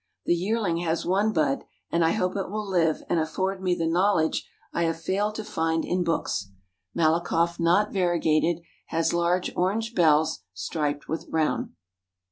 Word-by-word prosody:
The -, -, +3 dB
yearling 185 Hz, 0 st, 0 dB
has 170 Hz, -1 st, -1 dB
one 200 Hz, +4 st, +2 dB
bud, 150 Hz, -7 st, +1 dB, 0.3 s
and 170 Hz, 0 st, +2 dB
I 165 Hz, -, +3 dB
hope 185 Hz, -3 st, 0 dB
it 195 Hz, -2 st, -2 dB
will 210 Hz, +1 st, -3 dB
live 170 Hz, -4 st, +1 dB
and 170 Hz, -, +1 dB
afford 185 Hz, +4 st, -1 dB
me 180 Hz, -1 st, +1 dB
the 165 Hz, -, -1 dB
knowledge 170 Hz, -1 st, +1 dB, 0.2 s
I 170 Hz, -, +1 dB
have 165 Hz, 0 st, -1 dB
failed 200 Hz, +6 st, -1 dB
to 220 Hz, -, -4 dB
find 165 Hz, -4 st, -1 dB
in 180 Hz, 0 st, 0 dB
books. 165 Hz, -, -1 dB, 0.5 s
Malakoff 170 Hz, +1 st, +1 dB
not 175 Hz, +5 st, +3 dB
variegated, 170 Hz, -2 st, +1 dB, 0.2 s
has 165 Hz, 0 st, 0 dB
large 170 Hz, +1 st, +1 dB
orange 220 Hz, +6 st, 0 dB
bells, 160 Hz, -5 st, +3 dB, 0.2 s
striped 145 Hz, -, -2 dB
with 160 Hz, -, -4 dB
brown. 160 Hz, -1 st, -1 dB
170 Hz, 160 wpm, -26 LUFS, 160-190 Hz, 0.5 s, The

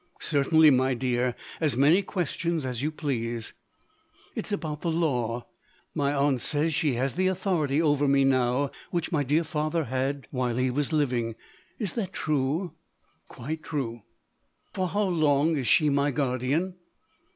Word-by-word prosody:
"Certainly, 155 Hz, +1 st, +4 dB
my 130 Hz, 0 st, +2 dB
dear! 125 Hz, 0 st, 0 dB, 0.2 s
As 150 Hz, -7 st, +1 dB
many 150 Hz, +8 st, +5 dB
questions 170 Hz, -4 st, -2 dB
as 125 Hz, -2 st, -3 dB
you 150 Hz, -, 0 dB
please." 120 Hz, -7 st, -3 dB, 0.8 s
"It's 220 Hz, -2 st, -4 dB
about 155 Hz, -7 st, -3 dB
the 170 Hz, -, -1 dB
law. 125 Hz, -8 st, 0 dB, 0.5 s
My 140 Hz, 0 st, +1 dB
aunt 140 Hz, -3 st, +1 dB
says 155 Hz, +5 st, +1 dB
she 145 Hz, -2 st, +1 dB
has 130 Hz, +2 st, -1 dB
the 185 Hz, +1 st, +1 dB
authority 170 Hz, -6 st, 0 dB
over 145 Hz, -3 st, +2 dB
me 140 Hz, 0 st, +4 dB
now, 130 Hz, +1 st, +2 dB, 0.2 s
which 175 Hz, -1 st, -2 dB
my 150 Hz, -4 st, +1 dB
dear 150 Hz, +5 st, +2 dB
father 155 Hz, +1 st, -1 dB
had 135 Hz, 0 st, -2 dB
while 125 Hz, -2 st, -1 dB
he 130 Hz, 0 st, +1 dB
was 145 Hz, +3 st, -1 dB
living. 125 Hz, -7 st, 0 dB, 0.4 s
Is 205 Hz, -7 st, -2 dB
that 195 Hz, -6 st, -3 dB
true?" 150 Hz, +4 st, -1 dB, 0.6 s
"Quite 155 Hz, +6 st, -6 dB
true." 130 Hz, -7 st, -4 dB, 0.7 s
"For 185 Hz, -1 st, -1 dB
how 205 Hz, +4 st, 0 dB
long 155 Hz, -2 st, +2 dB
is 130 Hz, -5 st, -2 dB
she 150 Hz, -2 st, +4 dB
my 140 Hz, +1 st, +2 dB
guardian?" 140 Hz, +7 st, -1 dB
145 Hz, 150 wpm, -27 LUFS, 130-160 Hz, 0.8 s, many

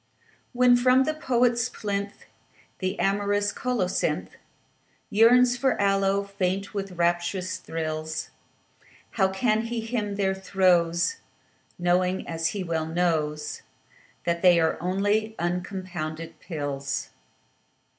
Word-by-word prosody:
When 250 Hz, 0 st, +5 dB
from 255 Hz, +2 st, +4 dB
the 310 Hz, -, -1 dB
poet's 245 Hz, -5 st, +1 dB
plinth 200 Hz, -1 st, -4 dB, 0.5 s
The 185 Hz, +1 st, -2 dB
amorous 205 Hz, +1 st, +1 dB
colocynth 220 Hz, -8 st, -1 dB, 0.8 s
Yearns 245 Hz, +3 st, +5 dB
for 265 Hz, +2 st, +2 dB
the -, -, -1 dB
aloe, 195 Hz, 0 st, +2 dB
faint 195 Hz, 0 st, -2 dB
with 195 Hz, -2 st, -4 dB
rapturous 175 Hz, +2 st, 0 dB
thrills, 155 Hz, -2 st, -4 dB, 0.8 s
How 190 Hz, -3 st, +2 dB
can 215 Hz, +3 st, +1 dB
he 235 Hz, 0 st, -3 dB
hymn 220 Hz, -3 st, -3 dB
their 195 Hz, -1 st, +1 dB
throes 185 Hz, -, +2 dB, 0.6 s
Knowing, 180 Hz, +1 st, +1 dB
as 165 Hz, 0 st, -1 dB
well 160 Hz, -2 st, -1 dB
he 160 Hz, -, -7 dB
knows, 155 Hz, -4 st, -1 dB, 0.6 s
That 170 Hz, 0 st, -1 dB
they 180 Hz, -2 st, +6 dB
are 160 Hz, -1 st, +1 dB
only 205 Hz, +4 st, 0 dB
uncompounded 175 Hz, -2 st, -4 dB
pills? 145 Hz, -4 st, -4 dB
190 Hz, 110 wpm, -26 LUFS, 170-210 Hz, 0.8 s, they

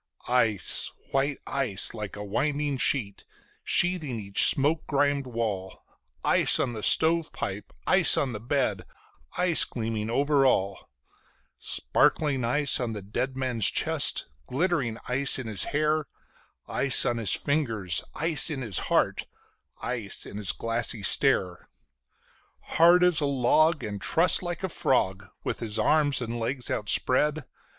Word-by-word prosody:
Ice, 115 Hz, -7 st, +2 dB, 0.2 s
white 140 Hz, +1 st, 0 dB
ice, 115 Hz, -8 st, 0 dB
like 105 Hz, -4 st, -6 dB
a 105 Hz, -, -7 dB
winding 145 Hz, +6 st, -2 dB
sheet, 105 Hz, -9 st, -1 dB, 0.4 s
sheathing 160 Hz, -9 st, 0 dB
each 100 Hz, -1 st, +4 dB
smoke 150 Hz, +4 st, 0 dB
grimed 140 Hz, -1 st, 0 dB
wall; 105 Hz, -6 st, -4 dB, 0.4 s
Ice -, -, +3 dB
on 120 Hz, -, -1 dB
the 110 Hz, -, -6 dB
stove 165 Hz, +6 st, +1 dB
pipe, 100 Hz, +1 st, -6 dB
ice 185 Hz, -3 st, +3 dB
on 130 Hz, -4 st, -1 dB
the 105 Hz, -, -5 dB
bed, 115 Hz, -4 st, -1 dB, 0.6 s
ice 180 Hz, -3 st, +3 dB
gleaming 110 Hz, -2 st, -4 dB
over 140 Hz, +3 st, +2 dB
all; 100 Hz, -7 st, 0 dB, 0.7 s
Sparkling 140 Hz, -5 st, 0 dB
ice 140 Hz, +4 st, +1 dB
on 120 Hz, -3 st, -3 dB
the 105 Hz, -2 st, -7 dB
dead 125 Hz, +6 st, -4 dB
man's 125 Hz, -5 st, 0 dB
chest, -, -, +1 dB, 0.2 s
glittering 135 Hz, -5 st, -1 dB
ice 130 Hz, +2 st, +1 dB
in 130 Hz, -, -6 dB
his 105 Hz, -5 st, -3 dB
hair, 150 Hz, 0 st, 0 dB, 0.6 s
Ice 135 Hz, -1 st, +3 dB
on 120 Hz, -2 st, 0 dB
his 110 Hz, -3 st, +2 dB
fingers, 115 Hz, -, -1 dB
ice 160 Hz, -1 st, +2 dB
in 135 Hz, -4 st, -4 dB
his 105 Hz, -7 st, +1 dB
heart, -, -, +1 dB, 0.6 s
ice 115 Hz, -6 st, -2 dB
in -, -, -9 dB
his 105 Hz, -3 st, -1 dB
glassy 115 Hz, -1 st, -3 dB
stare; 95 Hz, -7 st, +1 dB, 0.9 s
Hard 170 Hz, +2 st, +4 dB
as 180 Hz, -4 st, +3 dB
a 145 Hz, -, +1 dB
log 140 Hz, +3 st, +2 dB
and 105 Hz, -2 st, -5 dB
trussed 170 Hz, -, +2 dB
like 175 Hz, 0 st, -5 dB
a 190 Hz, -, -1 dB
frog, 95 Hz, -, 0 dB, 0.2 s
with -, -, -3 dB
his 110 Hz, -2 st, -4 dB
arms 145 Hz, +4 st, +2 dB
and 120 Hz, 0 st, -4 dB
legs 125 Hz, +2 st, -4 dB
outspread. 130 Hz, +7 st, +1 dB
130 Hz, 140 wpm, -26 LUFS, 110-150 Hz, 0.9 s, each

